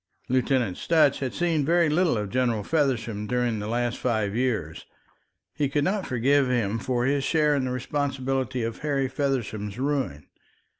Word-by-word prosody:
Lieutenant 125 -5 +1
Sutch 155 -4 +3
had 130 -2 -2
seen 165 -4 0
very 170 +3 +3
little 155 -3 +2
of 105 -2 -3
General 120 -4 +1
Feversham 120 -8 0
during 120 -2 0
the 105 - -4
last 120 +1 -1
five 110 -4 0
years. 110 -11 -2 0.7
He 145 -2 0
could 145 +1 +1
not 195 +2 -1
forgive 135 +2 +2
him 115 -3 0
for 120 0 -1
his 140 +1 +1
share 150 0 +2
in 140 -2 0
the 130 - -2
responsibility 130 -1 -2
of 115 0 -4
Harry 140 -3 0
Feversham's 125 -6 -2
ruin. 130 - -2
130 Hz, 160 wpm, -26 LUFS, 115-145 Hz, 0.7 s, Sutch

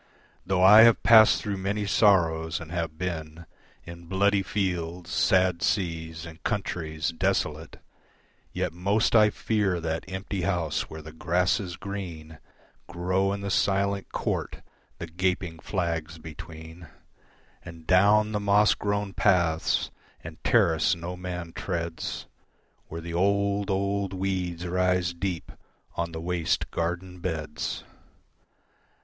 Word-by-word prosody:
Though 90 -1 +2
I 105 +4 +9
have 115 0 +6
passed 110 -2 +7
through 100 -2 -2
many 100 +2 -2
sorrows 85 -6 +3
and 85 -1 -9
have 85 -3 -3
been 80 -2 -5 0.4
In 85 0 -11
bloody 100 +2 +2
fields, 90 -3 -3
sad 90 -1 +2
seas, 80 -3 -2
and 85 0 -11
countries 80 -7 -2
desolate, 80 -4 -2 0.7
Yet - - -2
most 100 +7 +1
I 105 -1 +7
fear 100 -2 0
that 80 +2 -4
empty 95 +1 -4
house 85 -5 -1
where 80 0 -9
the 80 - -9
grasses 90 +3 0
green 85 -6 -7 0.5
Grow 90 +3 0
in 100 0 -3
the 100 0 -3
silent 100 0 0
court - - -3 0.3
the - - -5
gaping 90 -1 -2
flags 85 -3 -3
between, 80 +1 -10 0.8
And 85 -1 -11
down 105 +4 +4
the 105 - -1
moss 105 +1 +4
grown 100 -1 -2
paths 85 -6 +1 0.3
and 80 +1 -10
terrace 100 -2 +3
no 85 +1 -6
man 90 -2 -6
treads 85 -3 -4 0.6
Where 85 +1 -7
the 85 +1 -7
old, 100 +2 +1
old 100 0 -1
weeds 90 -2 -2
rise 90 0 +1
deep 85 -1 -4 0.4
on 85 0 -3
the 80 - -6
waste 85 -1 -1
garden 90 +2 -3
beds. 80 -4 -4
90 Hz, 125 wpm, -26 LUFS, 85-100 Hz, 0.8 s, I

